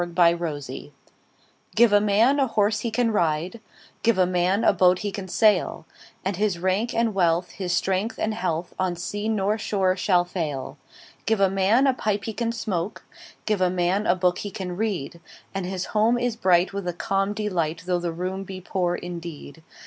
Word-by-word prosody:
Gifts 170 -4 +1 1.1
GIVE 230 -1 +5
a 205 - +6
man 220 +7 +3
a 270 - +3
horse 215 -1 +1
he 235 - -2
can 230 +1 +1
ride, 170 +3 0 0.4
Give 230 -3 +2
a 185 - +4
man 180 +4 +1
a - - +5
boat 180 -1 +4
he 205 - -1
can 195 -1 -6
sail; 185 -4 +2 0.4
And 190 -1 -1
his 205 -3 0
rank 190 +7 0
and 230 -1 +1
wealth, 175 -2 +1
his 185 -3 -4
strength 190 +5 0
and 220 - -1
health, 175 -5 -3
On 185 -1 0
sea 205 +5 -3
nor 210 0 0
shore 190 -3 +1
shall 180 -2 +2
fail. 155 -7 -4 0.5
Give 220 -1 +2
a 195 -1 +3
man 195 +7 +3
a 270 - +4
pipe 210 -4 -1
he 225 - -3
can 230 +1 -1
smoke, 205 -5 -3 0.4
5 - - -38
Give 210 -3 0
a 185 - +4
man 185 +3 0
a 180 - +4
book 180 -1 +1
he 205 - -4
can 190 -4 -5
read: 180 -6 -3 0.3
And 195 -2 -3
his 190 0 -3
home 220 +3 +3
is 245 -1 -1
bright 185 -4 +3
with 200 -2 -4
a 175 - -1
calm 195 +4 -1
delight, 170 -6 -2
Though 180 -1 0
the 175 -1 -2
room 185 +3 -4
be 190 -1 -7
poor 180 -1 -1
indeed. 170 -3 -8
190 Hz, 195 wpm, -24 LUFS, 175-215 Hz, 1.1 s, a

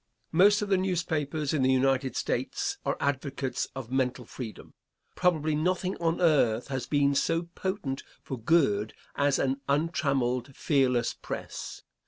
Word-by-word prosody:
Most 205 +5 +5
of 205 - -4
the 195 -2 +3
newspapers 160 -5 -1
in 150 - +1
the 130 0 +4
United 130 0 +2
States - - -2
are - - -1
advocates 140 -1 -1
of 130 -3 -7
mental 130 -2 0
freedom. 115 -1 -8 0.4
Probably 160 -4 +1
nothing 180 +4 0
on 165 -1 0
earth 135 -9 +3
has 130 -3 -3
been 140 -1 +3
so 165 +4 +1
potent 185 -10 -3 0.2
for 130 - -5
good 110 -6 +2 0.2
as 140 -1 +2
an 135 +1 0
untrammeled, 140 -4 0
fearless 125 -5 +2
press. - - -7
140 Hz, 140 wpm, -28 LUFS, 130-165 Hz, 0.4 s, Most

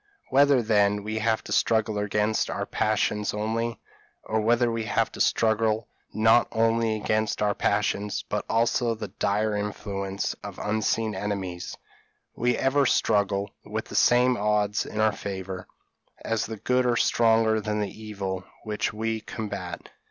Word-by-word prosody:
Whether, 140 -2 +5
then, 105 -2 +2
we 110 +1 -3
have 110 0 +1
to - - -9
struggle 110 -2 +2
against 105 +1 0
our - - -2
passions 105 -1 0
only, 115 +2 -2 0.4
or 110 0 -1
whether 120 +2 +3
we 115 -1 -2
have 105 - 0
to - - -5
struggle 110 0 +2 0.2
not 110 +2 +4
only 115 0 +2
against 110 0 0
our 105 -1 +2
passions, 105 0 0
but - - -2
also 115 +1 +2
the 105 -2 -6
dire 105 +3 0
influence 100 -1 -3
of - - -7
unseen 110 +1 0
enemies, 95 -3 -4 0.6
we 120 +1 +1
ever 135 +1 +2
struggle 100 -3 +1
with - - -4
the - - -9
same 125 +1 +4
odds 105 0 +1
in 110 - -5
our 110 -1 +3
favour, 95 -2 -6 0.6
as 115 -1 0
the 110 0 -6
good 125 +4 +1
are 120 -1 +2
stronger 110 -2 +3
than 105 0 -2
the 105 +1 -4
evil 95 -3 -4 0.2
which 105 -1 -2
we 110 +1 -2
combat. 100 -6 -6
110 Hz, 150 wpm, -26 LUFS, 105-115 Hz, 0.6 s, Whether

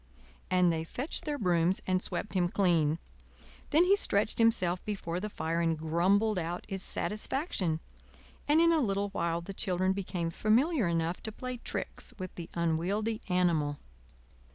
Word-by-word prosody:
And 180 -2 +4
they 160 0 -2
fetched 255 - -4
their 295 -1 -2
brooms 180 -3 +2
and 185 0 +1
swept 210 - -3
him 180 -2 +2
clean. 165 -6 +2 0.7
Then 315 +4 +5
he 390 +2 +5
stretched 210 - +2
himself 185 -6 +3
before 180 -5 -3
the 210 +3 -4
fire 165 -3 -2
and 165 -1 +1
grumbled 185 +6 +2
out 175 +1 -4
his 195 -2 -4
satisfaction; 210 - -1 0.7
and 300 +2 +5
in 335 0 +5
a 325 - +3
little 200 -3 0
while 170 -3 -1
the 195 +3 -7
children 185 0 +1
became 180 -3 -3
familiar 235 - +2
enough 165 +1 -1
to 220 - -5
play 255 +3 -5
tricks - - -5
with 185 -2 -6
the 170 -1 -8
unwieldy 180 +7 0
animal. 165 -5 +2
185 Hz, 155 wpm, -30 LUFS, 170-215 Hz, 0.7 s, Then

